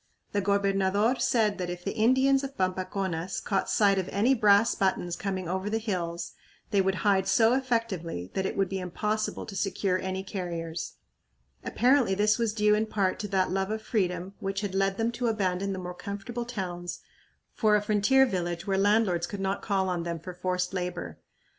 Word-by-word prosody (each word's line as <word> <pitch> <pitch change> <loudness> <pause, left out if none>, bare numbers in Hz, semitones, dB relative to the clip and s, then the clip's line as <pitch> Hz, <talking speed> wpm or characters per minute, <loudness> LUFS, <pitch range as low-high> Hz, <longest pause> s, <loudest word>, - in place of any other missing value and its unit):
The 205 - 0
gobernador 200 +3 +2
said 215 -4 +2
that 180 -1 -2
if 175 0 -6
the - - -1
Indians 260 +4 +3
of 275 0 -6
Pampaconas 185 -1 -2
caught 195 -2 -1
sight 200 -2 +3
of 185 - -3
any 225 +7 +3
brass 210 -2 +4
buttons 180 -3 0
coming 185 -1 -3
over 190 +3 -2
the 220 - 0
hills 175 -6 -3 0.4
they 200 -2 +4
would 190 0 +1
hide 195 -2 +3
so 225 +4 +4
effectively 225 - -2
that 190 0 0
it - - -5
would 195 -1 +2
be 190 +1 -3
impossible 210 +4 -2
to 200 - -8
secure 195 -1 0
any 190 0 -3
carriers. 170 -4 -4 0.7
Apparently 250 -4 +3
this 210 +3 +2
was 230 -2 +1
due 210 -1 +3
in 215 +1 +1
part 195 -4 0
to 205 - -3
that 190 -2 +1
love 190 +1 0
of 220 0 -3
freedom 180 -3 -1
which 195 0 -2
had 200 -3 -3
led 195 0 +1
them 230 +1 0
to 240 +1 -2
abandon 195 -3 0
the 190 - -3
more 180 -1 -5
comfortable 205 +5 -5
towns 180 -6 -5 0.5
for 215 -2 +3
a 210 - +3
frontier 215 +6 +4
village 175 -5 -3
where 195 -2 +1
landlords 200 -4 +2
could 200 - -6
not 195 +1 -1
call 195 -2 0
on 180 -2 -1
them 170 0 -3
for 180 +3 -8
forced 180 0 -2
labor. 180 - -4
195 Hz, 190 wpm, -28 LUFS, 185-215 Hz, 0.7 s, brass